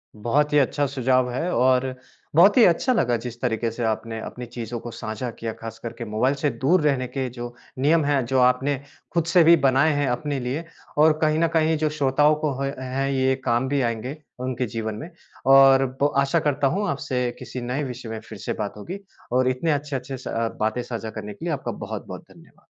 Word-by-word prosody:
बहुत 145 +8 +1
ही 150 - +5
अच्छा 145 +2 +1
सुझाव 130 -1 +1
है 165 +8 -2
और 130 0 +3 0.4
बहुत 195 +7 +6
ही 240 - +8
अच्छा 185 +9 +3
लगा 120 - +2
जिस 120 -1 -6
तरीके 115 -2 0
से 120 +1 -4
आपने 110 0 -2
अपनी 125 0 -7
चीज़ों 120 0 -6
को 120 - -8
साझा 110 +2 -5
किया। 115 -1 -3
ख़ास 115 0 -9
करके 115 0 -6
मोबाइल 120 +6 +1
से 145 +1 0
दूर 160 +6 +3
रहने 135 -4 +1
के 130 +1 -3
जो 120 0 -7 0.3
नियम 155 +2 +3
हैं, 140 -3 +1
जो 130 +2 +1
आपने 125 +3 +3 0.4
ख़ुद 170 -2 +2
से 165 +1 +5
भी 170 +1 +8
बनाए 135 +4 +4
हैं 145 -1 0
अपने 140 +3 -2
लिए 130 +6 -3 0.3
और 155 +1 +6
कहीं 155 0 +2
न 165 - +3
कहीं 160 0 +3
जो 155 0 +1
श्रोताओं 145 +1 +3
को 150 - +2
ह 140 0 -1
है 135 +2 -1
ये 130 0 +2
काम 120 +3 +1
भी 140 -1 +1
आएँगे 120 +5 -2 0.2
उनके 130 -1 -2
जीवन 110 -2 -4
में। 160 +9 -7 0.4
और 135 0 +7 0.2
ब 145 +1 +3
आशा 140 +4 +2
करता 145 -2 +1
हूँ 200 +7 0
आपसे 130 -3 -1
किसी 125 - -6
नए 125 +5 -2
विषय 125 -3 -6
में 110 -1 -4
फ़िर 110 - -8
से - - -3
बात 105 -1 -2
होगी। 180 - -7 0.3
और 130 +1 +3
इतने 140 +6 0
अच्छे-अच्छे 140 -2 -3
स 125 - -10
अ, 115 0 -1
बातें 110 +3 0
साझा 115 -2 -5
करने 105 -1 -7
के 165 - -9
लिए 170 - 0
आपका 140 - -3
बहुत-बहुत - - -7
धन्यवाद। - - -20
130 Hz, 215 wpm, -24 LUFS, 120-145 Hz, 0.4 s, ही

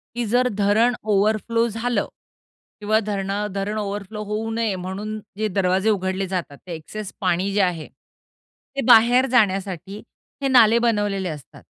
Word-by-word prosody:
की 240 0 -1
जर 245 +4 +2
धरणं 210 +4 +3 0.2
ओव्हरफ्लो 215 +3 +2
झालं 235 +2 -1 0.7
किंवा 215 +1 +2
धरणा 200 0 -2
धरणं 205 +2 -2
ओव्हरफ्लो 205 +1 -5
होऊ 210 +2 -3
नये, 225 -3 -1
म्हणून 195 +4 -5 0.2
जे 215 - 0
दरवाजे 190 +1 +1
उघडले 190 -1 -1
जातात. 175 -6 -4
ते 175 - -5
एक्सेस 195 +6 -7
पाणी 180 +4 +1
जे 205 - +2
आहे, 175 -4 -1
ते 275 0 -13
बाहेर 245 +2 +6
जाण्यासाठी 195 -4 0 0.4
हे 275 - +1
नाले 235 -3 +6
बनवलेले 205 -5 0
असतात. 150 -4 -10
205 Hz, 145 wpm, -22 LUFS, 190-225 Hz, 0.7 s, बाहेर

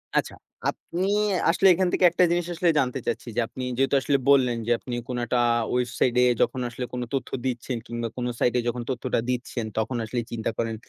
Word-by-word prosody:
আচ্ছা - - +1 0.4
আপনি 180 +2 -4 0.5
আসলে 185 +3 +4
এখান 185 +1 +1
থেকে 185 - +4
একটা 180 - +3
জিনিস 175 -1 +1
আসলে 175 +1 +1
জানতে 130 0 0
চাচ্ছি। - - -2
যে 120 - +2
আপনি 130 - -7
যেহেতু 135 +1 +2
আসলে 140 0 +2
বললেন 125 -4 +4
যে - - +1
আপনি 120 -2 -5
কোনো 125 -1 -3
একটা 120 +1 0 0.3
ওয়েবসাইটে 125 0 +1
এ - - +3
যখন 130 - +1
আসলে 125 +1 -5
কোনো 125 -1 -2
তথ্য 135 - -2 0.2
দিচ্ছেন 125 0 -2
কিংবা 115 0 -3
কোনো 125 0 -1
সাইট 120 - +2
এ - - +2
যখন 120 0 -2
তথ্যটা 130 -1 -1
দিচ্ছেন, 120 -2 -2
তখন 110 +3 -1
আসলে 120 +2 -2
চিন্তা 115 -1 -2
করেন 115 -1 -1
125 Hz, 205 wpm, -25 LUFS, 120-135 Hz, 0.5 s, আসলে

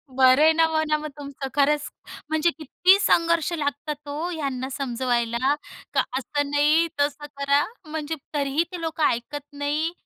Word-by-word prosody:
बरं 260 +1 +6
आहे 320 - +7
ना, 325 0 +4
म्हणा 315 -1 +1
मग 305 0 -5
तुमचं 280 -1 -6
खरंच. 290 +1 +2 0.4
म्हणजे 315 +2 +2
किती 355 +5 +4
संघर्ष 335 -3 +2
लागतात 295 -1 -3
हो 300 +5 -3
ह्यांना 275 -6 -3
समजवायला. 245 -1 0 0.4
का - - +4 0.2
असं 290 +2 -2
नाही, 300 +3 +3
तसं 290 +1 0
करा. 280 +1 +3 0.2
म्हणजे 310 0 -4 0.2
तरीही 285 +2 +1
ते 355 -2 -6
लोकं 320 -1 -2
ऐकत 280 +5 -2
नाही 295 +3 -1
290 Hz, 150 wpm, -24 LUFS, 280-315 Hz, 0.4 s, आहे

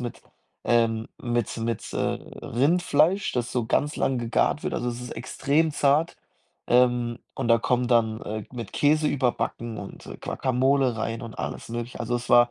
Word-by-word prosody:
mit, 120 -1 -6 0.4
ähm 115 -1 +2
mit 120 -2 -1
mit, 115 -1 -3
äh, - - -3
Rindfleisch, 160 - +1
das 120 -1 -1
so 120 -3 0
ganz 145 +5 +1
lang 130 -2 +1
gegart 120 +5 +1
wird. - - -2
Also, 120 - -1
es 120 0 -4
ist 125 - -7
extrem 145 +6 0
zart, 145 +4 +2 0.5
ähm, 120 -1 +3 0.2
und 130 -3 -2
da 115 0 +6
kommen 125 +1 +1
dann, 110 -2 +2
äh, 110 0 -4
mit 115 -5 -6
Käse 150 +1 +3
überbacken 120 -3 -1
und - - -9 0.2
Guacamole 130 -1 +1
rein 115 +1 -3
und 115 -1 -8
alles - - -5
Mögliche. 120 +1 -5
Also, 120 +1 -1
es 120 - -7
war 120 0 +7
120 Hz, 170 wpm, -26 LUFS, 115-135 Hz, 0.5 s, war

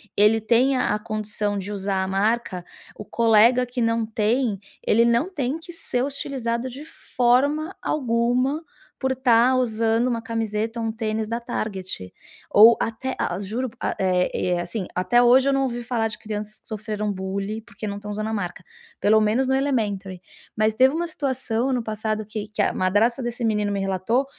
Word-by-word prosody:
ele 210 +2 +5
tenha 245 +2 +2
a 210 - +1
condição 210 -1 -3
de 195 0 -5
usar 195 -1 -1
a 190 - -1
marca, 195 -1 0 0.3
o - - -8
colega 230 +3 +4
que 245 0 -4
não 230 0 +1
tem, 220 +1 0 0.2
ele 230 - +3
não 235 +6 +2
tem 290 -3 -2
que 340 +1 -11
ser 250 -6 -2
hostilizado 260 -3 -3
de 275 +5 -9
forma 285 +4 +1
alguma 255 +3 0 0.4
por 265 -1 0
estar 250 -1 +4
usando 230 -1 +1
uma 230 -2 -2
camiseta 225 0 -2
ou 225 - -1
um - - -1
tênis 220 -1 -2
da 230 +2 -2
Target 190 - -4 0.4
ou 225 +3 +8
até 245 +4 -3
a - - -1
a - - -4
juro, 225 +6 -3
a - - -1
é 180 -1 +1
e - - -1
e - - +1
é 175 -1 +1
assim, 180 +2 -4
até 240 +7 +3
hoje 255 +3 +5
eu 275 - +3
não 275 - +2
ouvi 240 -2 -3
falar 230 -2 0
de 220 - -6
crianças 215 0 -6
que - - -27
sofreram 210 -1 -3
bullying 195 +3 -4
porque 220 -1 -9
não 200 -1 -4
estão 210 0 -8
usando 215 +1 -3
a 220 - -3
marca, 180 -4 -4 0.4
pelo 215 +1 +4
menos 230 +5 +2
no 265 - +2
elementary. 210 -9 -1 0.4
Mas 215 0 +2
teve 260 +5 +4
uma 345 - -1
situação 260 -6 -2
ano 250 -3 0
passado, 215 0 -3
que 210 0 -5
que 210 -1 -2
a - - +1
madrasta 210 +7 +2
desse 240 0 -3
menino 210 -2 +1
me 200 - -1
relatou, 195 +7 0
225 Hz, 190 wpm, -23 LUFS, 210-250 Hz, 0.4 s, ou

